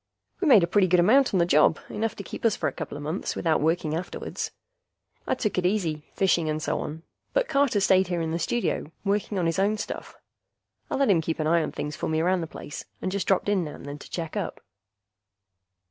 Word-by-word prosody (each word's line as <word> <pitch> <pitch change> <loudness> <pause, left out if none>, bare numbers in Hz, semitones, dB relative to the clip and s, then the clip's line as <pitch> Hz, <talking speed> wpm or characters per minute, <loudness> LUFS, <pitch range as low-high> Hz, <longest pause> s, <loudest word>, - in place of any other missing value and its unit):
We 360 - 0
made 220 - +7
a - - +2
pretty 190 +1 +3
good 180 0 +4
amount 250 +10 +5
on 195 - +2
the 170 - +4
job, 155 -1 +4
enough 225 +1 -2
to 200 - -7
keep - - -8
us 225 -3 +3
for - - -1
a - - -2
coupla 150 -3 -6
months 155 +6 -3
without 160 -3 +1
working 160 0 +1
afterwards. 175 +2 -4 0.8
I - - +2
took 210 -6 -1
it 180 - -2
easy, 165 -7 -1
fishing 175 -4 +2
and 155 0 -1
so 155 - -1
on, 160 +2 -6 0.3
but - - +2
Carter 275 - +2
stayed 190 -1 +4
here 175 -1 -1
in 165 -1 -2
the 165 - -1
studio 200 -5 -1
working 200 0 0
on 180 - +1
his 165 +2 0
own 205 +2 +2
stuff. - - -6 0.7
I - - -1
let 275 -5 +3
him 170 -4 +4
keep 160 0 -2
an 155 - -1
eye 165 +2 +3
on - - -2
things 150 0 -4
for - - -3
me 160 0 +1
around 180 +2 +2
the 165 - -4
place, 150 - -8 0.2
and 185 - -2
just 195 -2 -2
dropped 190 0 +2
in 200 -3 +2
now 150 - -6
and - - -11
then 145 +1 -7
to - - -12
check 165 -2 -4
up. - - -3
175 Hz, 240 wpm, -26 LUFS, 160-205 Hz, 0.8 s, made